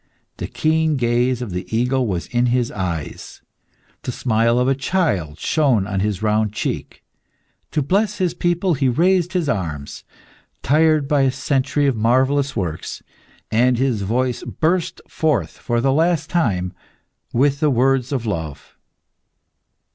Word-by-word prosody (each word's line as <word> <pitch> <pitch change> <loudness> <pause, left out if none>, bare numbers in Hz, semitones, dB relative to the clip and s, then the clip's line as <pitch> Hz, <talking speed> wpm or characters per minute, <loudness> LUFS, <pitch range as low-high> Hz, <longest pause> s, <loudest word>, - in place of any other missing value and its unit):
The - - -4
keen 160 -1 +1
gaze 120 +1 +1
of 110 - -6
the 90 +1 -4
eagle 125 +1 +1
was 90 -4 -2
in 120 0 0
his 120 -1 +1
eyes; 85 -6 -5 0.6
the - - -4
smile 115 -1 +1
of 125 +1 +2
a 135 - +4
child 130 - -1
shone 125 - +2
on 100 -2 -2
his 105 +1 -1
round 105 -1 +1
cheek. - - -4 0.7
To 150 - 0
bless 200 +8 +1
his 180 -3 0
people, 175 +1 0
he 135 -3 +1
raised 180 +6 +2
his 175 -4 0
arms, 80 - -3 0.6
tired 155 +1 +3
by 145 -1 +2
a 135 -1 +3
century 140 +2 0
of 135 -3 +2
marvellous 130 +5 +2
works, 85 -7 -4 0.5
and 125 +2 +3
his 125 -4 0
voice 120 +5 -1
burst 170 +2 -1
forth 135 - 0
for 120 -1 -1
the 135 +2 +2
last 160 +1 +1
time, 100 - 0 0.6
with 140 +3 +2
the 155 - +3
words 130 0 +2
of 130 -4 -2
love. 80 -8 -5
130 Hz, 145 wpm, -20 LUFS, 110-150 Hz, 0.7 s, a